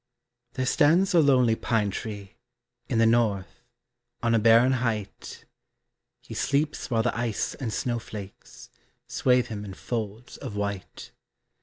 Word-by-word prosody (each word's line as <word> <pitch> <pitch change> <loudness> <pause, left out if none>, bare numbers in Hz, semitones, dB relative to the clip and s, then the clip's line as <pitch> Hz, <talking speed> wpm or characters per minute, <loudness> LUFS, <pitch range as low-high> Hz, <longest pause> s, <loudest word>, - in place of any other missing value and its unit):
SONG. 120 0 -55
There 130 - -2
stands 170 +9 +3
a 170 - +6
lonely 130 -6 +4
pine 110 -3 0
tree 100 -1 -6 0.6
In - - 0
the 115 - +5
north, 110 -4 +1 0.6
on 115 0 +2
a 115 - +4
barren 115 +4 +5
height; 115 -6 -3 0.8
He - - -10
sleeps 145 +2 -1
while 115 -3 +1
the 125 - 0
ice 115 -3 -2
and 125 -5 -5
snow 120 +2 -1
flakes 105 -3 -11 0.3
Swathe 125 -1 +2
him 105 -2 -5
in 95 -2 -8
folds 110 +1 -5
of 125 -7 -7
white. 100 -2 -5
115 Hz, 145 wpm, -26 LUFS, 105-125 Hz, 0.8 s, a